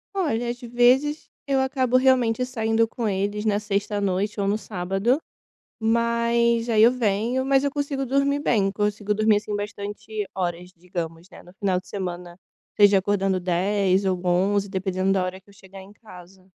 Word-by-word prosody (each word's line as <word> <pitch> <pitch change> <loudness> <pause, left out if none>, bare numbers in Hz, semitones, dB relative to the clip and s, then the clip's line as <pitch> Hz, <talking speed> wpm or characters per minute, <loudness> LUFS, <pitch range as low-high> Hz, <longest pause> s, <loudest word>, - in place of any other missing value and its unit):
Olha, 245 -11 -1
às 240 +1 -9
vezes 250 +5 +2 0.2
eu 275 -1 +2
acabo 260 -1 +1
realmente 250 -2 +2
saindo 225 -2 0
com 225 -1 -3
eles 205 +2 -2
na 205 -1 +2
sexta 205 0 -2
à - - -2
noite 200 +2 -1
ou 195 - 0
no 210 +2 0
sábado, 195 +6 -1 0.6
mas 235 +1 +1
aí 220 -2 +4
eu 235 - +8
venho, 240 +2 0
mas 270 0 +3
eu 285 - 0
consigo 280 -1 -2
dormir 275 +2 +1
bem, 200 -7 +1
consigo 210 0 -1
dormir 215 0 +3
assim 210 0 -3
bastante 205 +1 -5
horas, 180 -1 -3
digamos, 170 0 -6
né, - - -13
no 180 - -16
final 195 -3 0
de - - -27
semana, 180 -3 -6 0.4
seja 205 -1 +6
acordando 195 -1 0
10:00 190 +2 +1
ou 185 -2 0
11:00, 195 +3 +1
dependendo 190 0 -1
da 190 -1 +1
hora 185 +1 -5
que 190 - -36
eu - - -19
chegar 195 0 -13
em 195 +2 -14
casa. 185 -3 -15
205 Hz, 175 wpm, -24 LUFS, 190-235 Hz, 0.6 s, eu